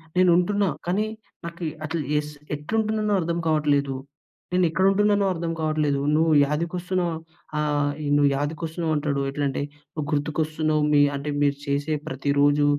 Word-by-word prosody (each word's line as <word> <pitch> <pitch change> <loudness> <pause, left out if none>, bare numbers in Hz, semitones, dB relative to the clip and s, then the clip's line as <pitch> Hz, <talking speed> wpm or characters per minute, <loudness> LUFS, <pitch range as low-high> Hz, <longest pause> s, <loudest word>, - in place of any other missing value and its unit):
"నేను 185 0 +5
ఉంటున్నా 200 +2 +2 0.2
కానీ 205 +4 +1 0.4
నాకు 170 0 -6 0.2
అట్లు 160 0 -2 0.2
ఎస్ 150 0 -3 0.2
ఎట్లుంటున్ననో 215 +6 -1
అర్థం 170 +1 -1
కావట్లేదు. 145 -3 +2 0.6
నేను 180 0 +4
ఎక్కడ 190 +4 +1
ఉంటున్నానో 205 0 +3
అర్థం 165 -1 -3
కావట్లేదు. 155 -2 +1 0.2
నువ్వు 160 +1 +3
యాధికొస్తున్నావు 170 +4 -1 0.5
ఆహ్, 145 -1 +1 0.2
నువ్వు 145 -1 +4
యాదికొస్తున్నావు 160 +2 -2
అంటాడు. 145 -2 -1
ఎట్లంటే 140 -1 -1
నువ్వు 150 0 -8
గుర్తుకొస్తున్నావు. 155 +1 0
మి 145 - +6
అంటే 140 +2 -3
మీరు 140 -1 +2
చేసే 145 +2 0
ప్రతి 140 +2 -2
రోజు 145 +1 +4
155 Hz, 135 wpm, -24 LUFS, 145-175 Hz, 0.6 s, మి